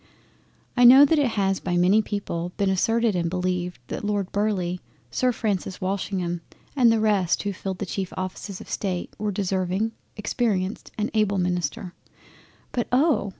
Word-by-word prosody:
I 245 Hz, -, +4 dB
know 260 Hz, +4 st, +10 dB
that 310 Hz, +2 st, +3 dB
it 285 Hz, -, +3 dB
has 195 Hz, -1 st, +1 dB
by 175 Hz, -2 st, -1 dB
many 185 Hz, +5 st, +5 dB
people 180 Hz, -5 st, -4 dB
been 200 Hz, -2 st, +2 dB
asserted 225 Hz, +3 st, +2 dB
and 170 Hz, -1 st, 0 dB
beleived 180 Hz, 0 st, -2 dB
that -, -, -4 dB
Lord 205 Hz, -2 st, -1 dB
Burleigh, 190 Hz, -4 st, 0 dB, 0.3 s
Sir 255 Hz, -1 st, +2 dB
Francis 200 Hz, -5 st, -2 dB
Walsingham, 185 Hz, -2 st, -2 dB, 0.3 s
and 245 Hz, -4 st, +5 dB
the 225 Hz, -, +2 dB
rest 205 Hz, -5 st, +2 dB
of -, -, -8 dB
those 205 Hz, -1 st, -2 dB
who -, -, -16 dB
filled 190 Hz, -1 st, -3 dB
the 200 Hz, -, -3 dB
cheif 190 Hz, 0 st, -4 dB
offices 185 Hz, +1 st, -5 dB
of -, -, -11 dB
State 185 Hz, -3 st, -3 dB
were 210 Hz, 0 st, -1 dB
deserving, 190 Hz, +2 st, -1 dB, 0.3 s
experienced, 210 Hz, -2 st, -1 dB
and 215 Hz, +1 st, -1 dB
able 210 Hz, -2 st, +2 dB
Ministers. 180 Hz, -1 st, -1 dB, 0.8 s
But 240 Hz, -, -1 dB
oh! 270 Hz, -5 st, +3 dB
195 Hz, 170 wpm, -25 LUFS, 180-215 Hz, 0.8 s, know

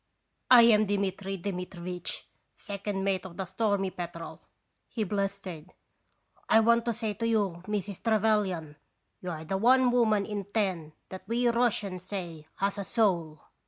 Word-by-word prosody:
" -, -, -49 dB
I -, -, +9 dB
am 215 Hz, -2 st, +5 dB
Dmitri 195 Hz, -1 st, -2 dB
Dmitrivitch, 180 Hz, -1 st, -5 dB, 0.3 s
second 200 Hz, -1 st, -4 dB
mate 195 Hz, -2 st, 0 dB
of 180 Hz, -2 st, -10 dB
the 190 Hz, -, -2 dB
Stormy 195 Hz, 0 st, 0 dB
Petrel," 170 Hz, -2 st, -7 dB, 0.5 s
he 225 Hz, -, -2 dB
blustered. 195 Hz, -5 st, -4 dB, 0.8 s
"I 220 Hz, -, +7 dB
want 235 Hz, +1 st, +3 dB
to 235 Hz, -, 0 dB
say 220 Hz, -1 st, -3 dB
to 230 Hz, +3 st, -2 dB
you, 200 Hz, -6 st, 0 dB
Mrs. 205 Hz, -2 st, -3 dB
Trevelyan, 210 Hz, -9 st, +1 dB, 0.4 s
you 180 Hz, -, -5 dB
are 160 Hz, -2 st, -5 dB
the 190 Hz, +4 st, -1 dB
one 250 Hz, +4 st, +5 dB
woman 220 Hz, -4 st, +3 dB
in 205 Hz, -2 st, -4 dB
ten 185 Hz, -7 st, -2 dB, 0.2 s
that 190 Hz, -, -7 dB
we 240 Hz, +2 st, +2 dB
Russians 215 Hz, -6 st, 0 dB
say 170 Hz, -6 st, -6 dB
has 200 Hz, +1 st, -1 dB
a -, -, -2 dB
soul 175 Hz, -9 st, 0 dB
200 Hz, 155 wpm, -29 LUFS, 180-220 Hz, 0.8 s, I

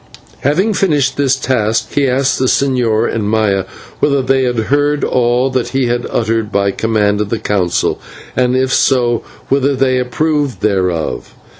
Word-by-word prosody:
Having 185 Hz, +10 st, +1 dB
finished 145 Hz, -9 st, 0 dB
his 135 Hz, -2 st, +3 dB
task, 115 Hz, -5 st, -1 dB
he 140 Hz, -1 st, +2 dB
asked 135 Hz, +1 st, +1 dB
the 130 Hz, -, +1 dB
señor 120 Hz, -5 st, +1 dB
and 105 Hz, -2 st, -2 dB
Maya 105 Hz, -3 st, +1 dB, 0.3 s
whether 140 Hz, -2 st, +1 dB
they 130 Hz, 0 st, +1 dB
had 125 Hz, -1 st, -1 dB, 0.2 s
heard 145 Hz, 0 st, +1 dB
all 125 Hz, +1 st, +1 dB
that 130 Hz, -2 st, -1 dB
he 135 Hz, -1 st, -1 dB
had 120 Hz, 0 st, -1 dB, 0.2 s
read 115 Hz, -1 st, -1 dB
by 100 Hz, 0 st, +1 dB
command 105 Hz, -1 st, 0 dB
of 105 Hz, -, -3 dB
the 115 Hz, -, -1 dB
Council, 100 Hz, -4 st, -1 dB, 0.4 s
and, 125 Hz, 0 st, +1 dB
if 130 Hz, 0 st, 0 dB
so, 120 Hz, -3 st, +2 dB, 0.3 s
whether 140 Hz, +1 st, +2 dB
they 130 Hz, -1 st, +1 dB
approved 145 Hz, +2 st, -1 dB
thereof. 90 Hz, -6 st, -1 dB
125 Hz, 160 wpm, -15 LUFS, 110-135 Hz, 0.4 s, his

